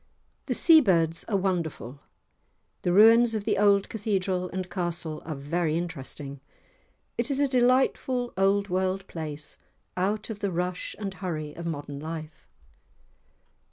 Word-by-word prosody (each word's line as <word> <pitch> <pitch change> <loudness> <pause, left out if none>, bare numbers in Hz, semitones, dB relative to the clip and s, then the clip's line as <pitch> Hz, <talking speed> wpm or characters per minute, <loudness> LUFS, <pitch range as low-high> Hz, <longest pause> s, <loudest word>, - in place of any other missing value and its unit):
The - - 0
seabirds 180 - +4
are 205 - 0
wonderful. 165 -8 -2 0.8
The 175 - 0
ruins 225 +4 +6
of 215 - -2
the - - 0
old 200 -1 +4
Cathedral 190 -4 -1
and 185 0 -4
castle 175 -4 -3
are 155 -1 -4
very 155 +3 -1
interesting, 140 -4 -6 0.8
it 235 - +1
is 275 -1 0
a 285 - +3
delightful 255 -1 +2
old 195 +1 +2
world 190 +1 -1
place, 150 -2 -5 0.4
out 205 +4 -1
of 210 - -7
the 200 - -1
rush 180 +1 -3
and 200 -2 -4
hurry 155 -6 -5
of 170 0 -6
modern 145 -3 -5
life. 155 0 -7
185 Hz, 135 wpm, -27 LUFS, 160-205 Hz, 0.8 s, ruins